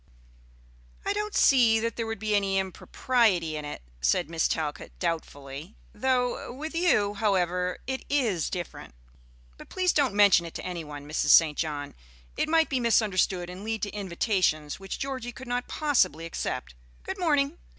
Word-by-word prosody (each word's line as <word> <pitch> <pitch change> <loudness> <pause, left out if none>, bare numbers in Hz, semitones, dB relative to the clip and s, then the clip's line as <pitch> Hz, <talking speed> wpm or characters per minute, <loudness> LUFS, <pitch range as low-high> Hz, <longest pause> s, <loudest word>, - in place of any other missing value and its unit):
"I - - +1
don't 420 0 -3
see 235 -5 +5
that 230 +1 -2
there 230 -1 -3
would 225 0 -3
be 215 +1 -2
any 195 -1 +2
impropriety 190 -2 +1
in 150 -1 -5
it," 145 - -7 0.2
said 65 - +1
Miss 165 -1 +2
Talcott, 150 -4 -3
doubtfully; 160 -1 -4 0.2
"though 250 +1 0
with 305 +6 -6
you, 330 - +2
however, 180 -3 0
it 265 +1 -3
is 230 - +1
different. 175 - -6 0.6
But - - -12
please 365 -1 +1
don't 275 -8 +2
mention 200 -4 +5
it 165 - -11
to - - -6
any 175 -2 -4
one, 145 -1 -9
Mrs. 150 - -1
St. 155 -3 +7
John. 145 -3 -3 0.4
It - - -1
might 325 0 +4
be 265 - 0
misunderstood 195 -6 +2
and 180 +2 -8
lead 220 -1 -3
to 205 - -2
invitations 185 -6 0
which 195 0 -6
Georgie 260 -3 -4
could 260 +1 -11
not 245 0 -2
possibly 255 - +1
accept. 165 - -4 0.3
Good 385 - -5
morning." 295 -2 +1
205 Hz, 165 wpm, -27 LUFS, 165-250 Hz, 0.6 s, St